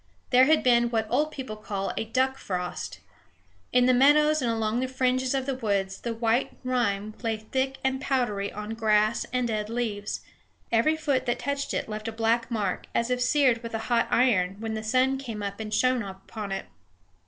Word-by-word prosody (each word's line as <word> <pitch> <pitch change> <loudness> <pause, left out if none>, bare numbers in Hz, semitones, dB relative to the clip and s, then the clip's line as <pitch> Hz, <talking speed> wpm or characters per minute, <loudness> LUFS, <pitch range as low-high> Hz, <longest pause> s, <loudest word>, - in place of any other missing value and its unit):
There 255 0 +7
had 310 +2 +4
been 240 -1 +4
what 225 -2 0
old 295 +5 +2
people 260 -7 -6
call 200 -2 -4
a - - -2
duck 260 +4 0
frost. 180 -2 -4 0.7
In 250 0 +4
the 255 - +5
meadows 300 +4 +5
and 245 - 0
along 225 0 0
the 260 - -1
fringes 255 0 0
of 265 -1 -1
the 275 - -1
woods 200 -6 -1
the 235 - -3
white 230 +2 0
rime 215 -5 0
lay 225 -2 -1
thick 265 +5 -2
and 265 0 0
powdery 230 -8 0
on 210 +1 -6
grass 215 -1 +2
and 250 -1 0
dead 215 -2 -2
leaves; 220 -3 -3 0.5
every 235 +8 +3
foot 280 -5 0
that 240 - +1
touched 280 0 -2
it - - -2
left 215 0 -5
a - - -2
black 230 +1 +1
mark, 210 -6 -2
as 235 +2 +1
if 250 0 0
seared 255 -2 +3
with 230 -1 -5
a 220 +1 -5
hot 230 - +3
iron, 200 -7 +3
when 220 0 -3
the 220 - -3
sun 255 +4 +2
came 225 -6 -6
up 200 +1 -4
and 215 -1 -5
shone 255 +3 +2
upon 200 +1 -7
it. 195 - -3
235 Hz, 200 wpm, -27 LUFS, 215-255 Hz, 0.7 s, There